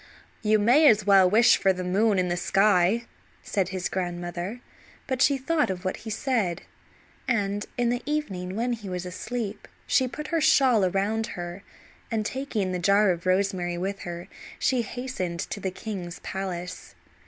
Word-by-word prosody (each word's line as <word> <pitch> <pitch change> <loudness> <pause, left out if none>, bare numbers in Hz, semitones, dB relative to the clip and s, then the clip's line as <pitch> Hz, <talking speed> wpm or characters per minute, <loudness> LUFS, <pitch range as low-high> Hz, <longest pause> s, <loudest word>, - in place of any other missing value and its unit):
"You 215 0 +3
may 245 +9 +5
as 210 -5 +5
well 195 -2 +6
wish 225 +5 +6
for 195 - +3
the 185 0 -5
moon 200 +3 +2
in 180 -1 +1
the 175 - 0
sky," 195 +4 +3 0.4
said 190 -3 -1
his 185 -1 -2
grandmother; 175 +3 -4 0.5
but 260 -1 -2
she 280 -1 +4
thought 300 +1 +1
of 185 0 -4
what 185 - -1
he 225 - -8
said, 215 -6 -1 0.6
and 205 -4 0
in 240 -1 +2
the 245 0 -1
evening 195 -12 -3
when 240 +3 0
he 215 -4 -6
was 180 0 -4
asleep 215 +3 -5 0.2
she 260 - +2
put 290 +5 -7
her 330 -1 +1
shawl 265 -8 +5
around 200 +4 0
her, 175 +2 -6 0.5
and 220 -2 -1
taking 225 -7 -2
the 180 - -2
jar 200 +2 +4
of 175 0 -4
rosemary 185 -2 +1
with 195 +2 -3
her 175 0 -7 0.3
she 255 -2 +1
hastened 225 -8 -4
to 205 - -5
the 190 - -2
king's 185 -3 -6
palace. 180 -2 -5
200 Hz, 170 wpm, -26 LUFS, 180-235 Hz, 0.6 s, well